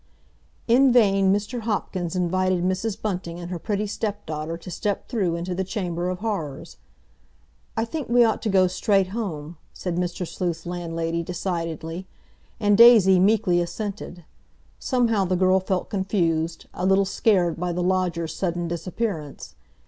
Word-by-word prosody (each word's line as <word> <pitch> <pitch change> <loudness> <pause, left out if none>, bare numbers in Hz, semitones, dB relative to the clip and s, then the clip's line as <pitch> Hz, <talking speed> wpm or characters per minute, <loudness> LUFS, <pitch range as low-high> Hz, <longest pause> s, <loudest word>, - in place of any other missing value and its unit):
In 255 +3 +5
vain 195 -5 +4
Mr. 205 +5 -1
Hopkins 190 -5 -2
invited 185 0 +1
Mrs. 190 +3 -1
Bunting 180 -5 -4
and 175 +1 -7
her 175 - -3
pretty 210 +3 -2
stepdaughter 170 -7 -4
to 175 +2 -10
step 205 +3 -2
through 195 -9 0
into 175 +2 -3
the 190 +2 -1
Chamber 180 -3 -3
of 185 +1 -4
Horrors. 175 -11 -4 1.0
"I 225 - +1
think 290 +3 -5
we 240 0 +6
ought 225 -2 +1
to 220 - -1
go 190 -2 +4
straight 190 +1 +1
home," 175 -7 -5 0.2
said 175 -2 -4
Mr. 180 0 -2
Sleuth's 170 -2 -3
landlady 170 -1 -3
decidedly. 165 0 -4 0.5
And 205 0 +3
Daisy 215 -6 +8
meekly 190 -3 +3
assented. 190 -2 -5 0.5
Somehow 235 -6 +1
the 185 0 0
girl 185 +1 +4
felt 185 -1 -2
confused, 170 -5 -1
a 180 - -5
little 195 +1 +4
scared 185 -4 +1
by 180 0 -1
the 175 +1 -2
lodger's 175 -3 0
sudden 175 -1 -2
disappearance. 170 -2 -4
185 Hz, 150 wpm, -24 LUFS, 170-205 Hz, 1.0 s, Daisy